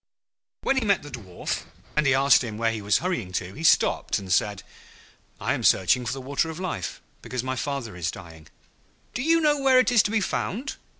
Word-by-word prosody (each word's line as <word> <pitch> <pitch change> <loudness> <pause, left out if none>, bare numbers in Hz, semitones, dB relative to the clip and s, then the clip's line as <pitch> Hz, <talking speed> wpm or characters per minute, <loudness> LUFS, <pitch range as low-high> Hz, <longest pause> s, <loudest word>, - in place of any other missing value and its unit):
When 270 - +1
he 260 - +1
met 200 -6 +2
the 145 - -10
Dwarf, 95 -8 -5 0.3
and 150 -1 +2
he 135 - +4
asked 135 0 +5
him 110 -3 -5
where 115 0 +1
he 110 -2 -4
was 105 +1 +3
hurrying 120 - -2
to, 90 0 -3
he 160 - -8
stopped - - +3
and 95 -2 -2
said, 100 0 0 0.8
'I - - 0
am - - -3
searching 120 +7 +3
for - - -1
the 135 - -5
Water 140 +5 -1
of 160 +1 -7
Life, 170 - -4 0.2
because 125 -1 -4
my 130 0 -2
father 130 -6 -4
is 85 -2 -2
dying.' 80 -4 -10 0.7
'Do 250 - -3
you 330 +4 +3
know 300 -2 +2
where 265 -1 +5
it 255 0 +4
is 235 -3 +6
to - - -1
be 220 +1 +1
found?' 235 +5 -3
130 Hz, 220 wpm, -25 LUFS, -, 0.8 s, is